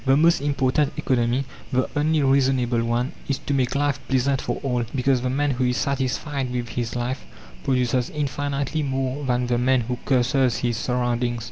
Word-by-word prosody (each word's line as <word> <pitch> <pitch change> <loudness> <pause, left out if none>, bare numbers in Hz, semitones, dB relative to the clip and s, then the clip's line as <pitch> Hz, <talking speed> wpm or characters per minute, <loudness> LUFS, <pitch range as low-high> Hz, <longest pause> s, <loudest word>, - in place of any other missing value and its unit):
The 135 0 +4
most 165 -1 +4
important 140 0 +1
economy, 125 +1 +1 0.3
the 130 -1 +1
only 150 0 +2
reasonable 130 -3 +2
one, 120 +2 0 0.2
is 135 - +1
to 140 - 0
make 130 -1 +1
life 145 -1 +1
pleasant 135 +1 +1
for - - -2
all, 125 -3 0
because 130 -1 +2
the 125 - -1
man 145 +2 +1
who 130 0 -1
is 125 0 +1
satisfied 135 -1 -1
with 120 -2 -3
his 115 0 -3
life 125 +2 -2 0.4
produces 125 -2 +1
infinitely 145 0 -2
more 135 0 -2
than 125 -1 +1
the 120 -1 +1
man 130 0 +3
who 120 +1 -3
curses 130 -1 +2
his 120 -2 0
surroundings. 120 -1 0
130 Hz, 175 wpm, -23 LUFS, 125-140 Hz, 0.4 s, The